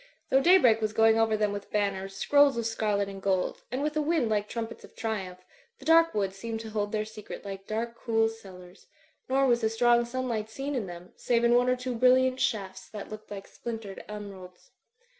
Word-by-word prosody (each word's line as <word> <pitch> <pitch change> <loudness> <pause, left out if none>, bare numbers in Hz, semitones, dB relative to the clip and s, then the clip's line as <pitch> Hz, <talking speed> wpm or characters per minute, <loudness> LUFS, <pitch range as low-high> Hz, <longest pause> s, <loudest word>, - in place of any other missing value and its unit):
Though 270 - +5
daybreak 265 -10 +5
was 215 -1 -1
going 225 0 +4
over 220 -1 +2
them 210 -1 +1
with 205 0 -6
banners, 195 -2 -1
scrolls 285 +4 +4
of 235 - -1
scarlet 210 -3 0
and 195 -1 -8
gold, 190 -2 0
and 260 +3 -2
with 300 0 -1
a 305 - +2
wind 305 -6 +1
like 210 -1 0
trumpets 230 -1 -5
of - - -15
triumph, 190 -5 -4 0.3
the - - -15
dark 330 -1 +5
woods 195 -2 -1
seemed 225 +2 -4
to 220 -1 -8
hold 205 -1 -2
their 215 -1 -1
secret 215 -1 -9
like 195 -1 -7
dark, 230 +2 -3
cool 225 -1 +1
cellars; 190 -4 -12 0.4
nor 270 +1 +3
was 240 -2 +3
the 220 - +2
strong 240 +1 +3
sunlight 235 -3 -3
seen 275 +5 -4
in 235 -7 -2
them, 175 0 -10
save 235 -1 +1
in 235 0 +4
one 245 +1 +4
or 250 - +3
two 250 0 -4
brilliant 255 +2 +4
shafts, 200 -7 -2
that 210 -2 -8
looked 215 0 -9
like 200 -1 -8
splin 235 -1 -6
tered 200 -3 -9
emeralds. 195 -4 -10
225 Hz, 215 wpm, -28 LUFS, 200-245 Hz, 0.4 s, Though